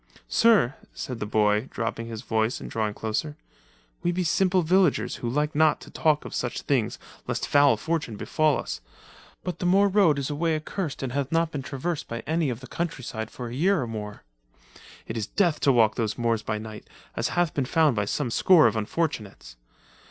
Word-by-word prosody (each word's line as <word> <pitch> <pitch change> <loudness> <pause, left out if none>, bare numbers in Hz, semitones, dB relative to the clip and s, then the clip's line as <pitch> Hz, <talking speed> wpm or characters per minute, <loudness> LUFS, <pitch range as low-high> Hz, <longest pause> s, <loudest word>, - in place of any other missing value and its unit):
Sir," 215 - +4 0.2
said 125 -3 -5
the 105 - -3
boy, 105 +2 +2
dropping 115 0 -3
his 115 0 -7
voice 110 0 0
and - - -8
drawing 105 -2 -1
closer, 130 +8 -3 0.6
"we 175 0 +1
be 180 +1 -1
simple 185 +1 +2
villagers 180 -1 +2
who 120 - -3
like 150 +4 0
not 155 0 +3
to - - -12
talk 155 -2 +1
of - - -7
such 120 +1 -3
things 130 -6 0 0.3
lest - - -2
foul 145 0 +5
fortune 160 -9 -2
befall 155 +6 +1
us, - - -5 0.6
but 180 - -4
the - - -3
moor 195 +3 +5
road 190 -7 +4
is 140 +1 -2
a - - -2
way 165 +1 +1
accurst 155 -1 -4
and 130 - -3
hath 140 +1 -2
not 165 0 +1
been 145 - -4
traversed 145 +5 -4
by 115 0 -5
any 160 -1 0
of 120 0 -4
the 130 - -10
countryside 125 -9 -4
for 120 -2 -7
a - - -7
year 180 +8 +2
or 125 - -1
more. 105 -2 -6 0.8
It 110 - -5
is 105 -3 -2
death 175 -7 +1
to 140 - +4
walk 115 -4 +4
those 110 -3 -2
moors 115 -2 0
by 110 0 -2
night, 110 0 -9 0.3
as - - 0
hath 175 -3 +2
been 140 - 0
found 155 -1 +3
by 105 -1 0
some 125 +3 -2
score 175 +5 +6
of - - +3
unfortunates. 110 - -3
140 Hz, 205 wpm, -26 LUFS, 115-165 Hz, 0.8 s, score